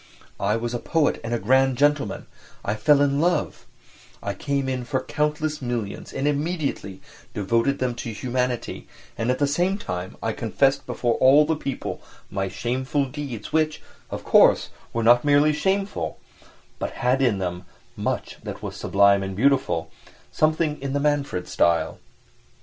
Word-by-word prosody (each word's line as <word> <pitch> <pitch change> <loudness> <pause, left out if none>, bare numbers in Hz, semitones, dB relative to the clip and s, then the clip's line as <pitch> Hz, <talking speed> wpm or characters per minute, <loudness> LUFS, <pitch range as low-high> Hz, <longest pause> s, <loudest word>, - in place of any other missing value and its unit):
I 100 +2 +1
was 120 +1 -3
a 120 - -1
poet 160 +2 +1
and 115 - -4
a 120 - +1
grand 130 +4 +3
gentleman, 145 -7 +1 0.4
I 100 - 0
fell 140 +7 +4
in 140 0 +1
love; 175 -2 0 0.6
I - - -2
came 140 -1 -2
in 130 -1 -2
for 130 +2 -1
countless 150 +2 -1
millions 120 -5 -4
and 135 +2 -1
immediately 145 - -2 0.3
devoted 115 +7 +1
them 125 -1 -1
to 115 - -5
humanity, 125 +2 -2 0.3
and 115 +2 -2
at 125 - +2
the 145 - +2
same 175 +7 +1
time 90 - -5
I 115 - 0
confessed 135 +5 +1
before 120 -1 0
all 140 +3 +6
the 160 +1 +1
people 140 -3 -5 0.3
my 95 0 -1
shameful 130 +7 -1
deeds, 135 -4 -6
which, 155 -1 +1 0.3
of - - -5
course, - - +5 0.2
were 115 - -1
not 120 +2 +6
merely 145 +1 +4
shameful, 195 +5 -1 0.6
but - - -3
had 130 +2 +3
in 120 -6 +3
them 90 -1 -4 0.3
much - - -3
that - - -7
was - - -5
"sublime 100 0 +4
and 95 0 -4
beautiful" 115 -10 +1 0.4
something 155 -1 +1
in 135 -1 -3
the 145 - +1
Manfred 140 -11 0
style. 85 -1 +1
130 Hz, 160 wpm, -24 LUFS, 115-145 Hz, 0.6 s, all